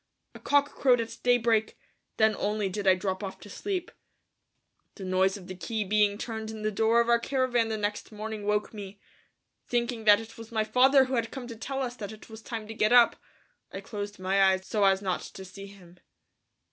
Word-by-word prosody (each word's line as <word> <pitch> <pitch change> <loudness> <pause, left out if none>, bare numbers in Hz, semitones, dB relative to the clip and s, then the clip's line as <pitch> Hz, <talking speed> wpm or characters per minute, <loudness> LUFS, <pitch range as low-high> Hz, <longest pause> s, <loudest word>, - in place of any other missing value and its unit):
A - - -11
cock 285 0 +2
crowed 250 -3 +3
at 230 0 -4
daybreak; 230 -3 +2 0.4
then 220 0 +4
only 210 -1 -1
did 195 +1 -4
I 190 - +7
drop 185 +1 -3
off 195 - -6
to 205 - -11
sleep. 375 - -4 1.0
The 200 - -9
noise 190 +1 +1
of 190 - -12
the 185 - -7
key 210 +5 -3
being 205 0 +2
turned 220 -1 -5
in 220 -1 -7
the 215 - 0
door 225 +3 +3
of 235 - -1
our 235 0 +4
caravan 245 -2 +1
the 220 -1 -2
next 210 +1 -3
morning 215 -1 -6
woke 210 +1 0
me. 200 -1 -9 0.7
Thinking 235 -2 -1
that 205 0 +7
it 225 0 -11
was 225 +1 -10
my 220 -1 +1
father 265 +5 +5
who 260 - -5
had 230 -2 0
come 260 0 -7
to 230 - -7
tell 270 +4 -4
us 245 -1 -4
that 205 -3 -6
it 220 +1 -13
was 220 0 -10
time 220 -2 -6
to 225 - -7
get 215 0 +1
up, 240 -1 +6 0.6
I - - -6
closed 205 -2 -6
my 190 +1 +1
eyes 190 0 +2
so 210 0 0
as 195 0 +3
not 185 -2 -1
to 190 - -10
see 195 +2 -10
him. 180 -3 -16
215 Hz, 215 wpm, -28 LUFS, 200-235 Hz, 1.0 s, I